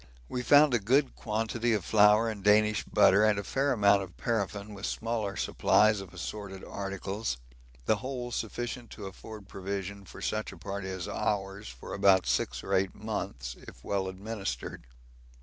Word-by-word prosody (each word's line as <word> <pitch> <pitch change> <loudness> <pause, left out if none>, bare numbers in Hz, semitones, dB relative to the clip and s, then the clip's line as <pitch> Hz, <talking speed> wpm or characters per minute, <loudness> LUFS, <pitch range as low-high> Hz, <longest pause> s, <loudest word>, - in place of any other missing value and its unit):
We 125 - -3
found 145 +3 +6
a 120 - +4
good 130 +7 +2
quantity 115 +2 -1
of 100 -5 -1
flour 105 +1 +5
and 105 -3 -4
Danish 105 +1 +4
butter 100 +3 +5
and 110 -1 +4
a 100 - -2
fair 135 +6 0
amount 100 -3 +4
of 95 -2 -9
paraffin, 105 -2 -2
with 100 0 -4
smaller 110 -3 -2
supplies 105 -1 +3
of 95 -2 -10
assorted 95 +1 -6
articles 100 - -4 0.5
the 110 - +3
whole 125 +1 -5
sufficient 120 +1 -4
to 105 - -8
afford 100 +2 -9
provision 100 +1 -5
for - - -11
such 110 0 -2
a - - -12
party 100 -1 -5
as 95 -1 -4
ours 95 - -2
for 60 0 -9
about 95 -2 +4
six - - 0
or - - -3
eight 95 0 +1
months 100 - -4
if - - -12
well 95 -1 -1
administered. 95 - -5
105 Hz, 165 wpm, -30 LUFS, 95-110 Hz, 0.5 s, found